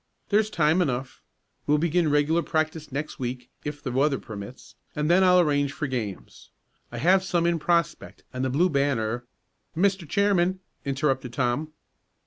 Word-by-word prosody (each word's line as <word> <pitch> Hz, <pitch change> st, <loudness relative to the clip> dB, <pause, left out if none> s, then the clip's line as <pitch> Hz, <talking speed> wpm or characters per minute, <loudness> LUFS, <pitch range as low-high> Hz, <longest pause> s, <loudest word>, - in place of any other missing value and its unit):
There's 215 Hz, +1 st, +3 dB
time 165 Hz, -2 st, +2 dB
enough. 130 Hz, -4 st, -2 dB, 0.5 s
We'll 150 Hz, -, +4 dB
begin 170 Hz, +1 st, +1 dB
regular 150 Hz, +3 st, +2 dB
practice 155 Hz, -2 st, -2 dB
next 150 Hz, +3 st, -4 dB
week, 125 Hz, -1 st, -5 dB
if 145 Hz, 0 st, -6 dB
the 125 Hz, -, -3 dB
weather 135 Hz, +2 st, +2 dB
permits, 105 Hz, +2 st, -9 dB, 0.2 s
and 150 Hz, +2 st, +1 dB
then 185 Hz, +2 st, +5 dB
I'll 180 Hz, -1 st, +6 dB
arrange 145 Hz, -4 st, +2 dB
for 155 Hz, -, -3 dB
games. 120 Hz, -8 st, -5 dB, 0.4 s
I 120 Hz, -, -6 dB
have 185 Hz, +9 st, +4 dB
some 175 Hz, -3 st, 0 dB
in 170 Hz, -1 st, +1 dB
prospect, 170 Hz, 0 st, -1 dB
and 125 Hz, +1 st, -3 dB
the 130 Hz, -, 0 dB
Blue 155 Hz, +8 st, +3 dB
Banner 125 Hz, -6 st, 0 dB, 0.3 s
" 105 Hz, +8 st, -24 dB
"Mr. 190 Hz, -3 st, +1 dB
Chairman!" 190 Hz, -2 st, +2 dB, 0.3 s
interrupted 135 Hz, -3 st, -1 dB
Tom. 135 Hz, +5 st, -1 dB
150 Hz, 160 wpm, -26 LUFS, 130-170 Hz, 0.5 s, I'll